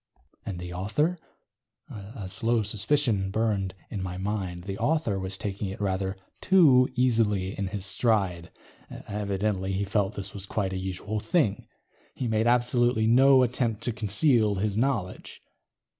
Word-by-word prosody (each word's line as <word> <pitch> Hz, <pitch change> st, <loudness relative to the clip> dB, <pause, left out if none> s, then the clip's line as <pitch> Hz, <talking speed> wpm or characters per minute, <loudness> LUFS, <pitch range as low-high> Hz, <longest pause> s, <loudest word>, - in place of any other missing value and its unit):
And 95 Hz, -4 st, -4 dB
the 90 Hz, 0 st, -7 dB
author? 115 Hz, -, 0 dB, 0.7 s
A 100 Hz, 0 st, -8 dB
slow 115 Hz, +4 st, +1 dB
suspicion 105 Hz, -1 st, 0 dB
burned 100 Hz, -3 st, -1 dB, 0.2 s
in 100 Hz, -, -4 dB
my 90 Hz, -1 st, -4 dB
mind. 95 Hz, -3 st, -3 dB
The 95 Hz, +1 st, -6 dB
author 150 Hz, -11 st, 0 dB
was 95 Hz, +1 st, -5 dB
taking 100 Hz, 0 st, -4 dB
it 95 Hz, -, -6 dB
rather 95 Hz, -1 st, -1 dB, 0.2 s
too 145 Hz, -10 st, +5 dB
easily 110 Hz, -6 st, +1 dB
in 100 Hz, -, -3 dB
his 100 Hz, 0 st, -4 dB
stride. 95 Hz, -5 st, +1 dB, 0.4 s
Evidently, 100 Hz, -1 st, -3 dB
he 100 Hz, +2 st, -1 dB
felt 100 Hz, 0 st, 0 dB
this 100 Hz, -1 st, -5 dB
was 100 Hz, -1 st, -7 dB
quite 95 Hz, -2 st, -2 dB
a -, -, -2 dB
usual 95 Hz, +3 st, -4 dB
thing. 110 Hz, -, 0 dB, 0.5 s
He 125 Hz, -, -3 dB
made 110 Hz, 0 st, +1 dB
absolutely 120 Hz, -1 st, +2 dB
no 130 Hz, +3 st, +6 dB
attempt 120 Hz, -3 st, -1 dB
to 120 Hz, -, 0 dB
conceal 110 Hz, 0 st, +2 dB
this 100 Hz, +1 st, -1 dB
knowledge. 115 Hz, -6 st, -2 dB
105 Hz, 145 wpm, -27 LUFS, 95-120 Hz, 0.7 s, no